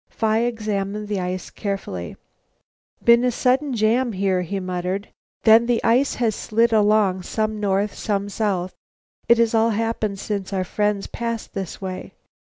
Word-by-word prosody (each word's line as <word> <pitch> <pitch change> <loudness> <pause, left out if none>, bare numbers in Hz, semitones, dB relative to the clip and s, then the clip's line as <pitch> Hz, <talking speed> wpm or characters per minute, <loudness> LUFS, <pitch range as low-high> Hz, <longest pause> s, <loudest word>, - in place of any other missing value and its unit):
Phi 220 -1 +1
examined 210 -3 -2
the 205 -2 -1
ice 180 0 -4
carefully. 195 - -4 0.9
"Been 235 +1 +6
a 250 - +3
sudden 260 +3 +1
jam 230 +2 +2
here," 190 -1 +1
he 195 +3 -3
muttered; 185 +2 -3 0.3
"then 225 +1 +6
the 240 -2 +2
ice 250 +4 +3
has 230 -3 +1
slid 230 +3 +1
along, 210 -3 +3
some 215 +3 -2
north, 200 0 0
some 200 -1 -2
south. 195 -3 -1 0.6
It 235 - +7
has 230 -1 +2
all 225 0 +4
happened 220 -2 -1
since 200 -1 -4
our 190 -1 0
friends 205 +1 -1
passed 230 -1 -4
this 190 -4 -5
way. 185 -1 -6
210 Hz, 155 wpm, -22 LUFS, 195-230 Hz, 0.9 s, It